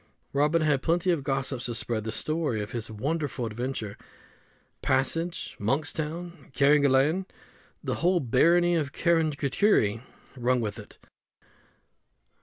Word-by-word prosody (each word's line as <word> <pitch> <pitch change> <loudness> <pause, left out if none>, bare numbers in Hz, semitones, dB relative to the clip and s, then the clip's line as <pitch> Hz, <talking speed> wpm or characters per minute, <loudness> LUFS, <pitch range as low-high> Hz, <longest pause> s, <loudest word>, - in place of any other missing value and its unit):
Robin 150 +3 +2
had 145 -3 +2
plenty 175 +3 +1
of 165 -4 0
gossips 135 -2 -2
to 120 - -3
spread 110 -2 -2
the 110 - -2
story 155 -2 -1
of 105 +1 -5
his 115 -2 -4
wonderful 145 +4 -2
adventure: 115 -2 -4 0.8
Passage, 165 +6 0
Monkstown, 155 +7 -3
Carrigaline 145 +5 +3 0.6
the - - -1
whole 180 +1 +3
barony 170 +7 +3
of 150 -5 -1
Kerricurrihy 155 - +2 0.3
rung 125 0 +1
with 110 -1 -3
it. 105 - -13
140 Hz, 115 wpm, -27 LUFS, 120-165 Hz, 0.8 s, Carrigaline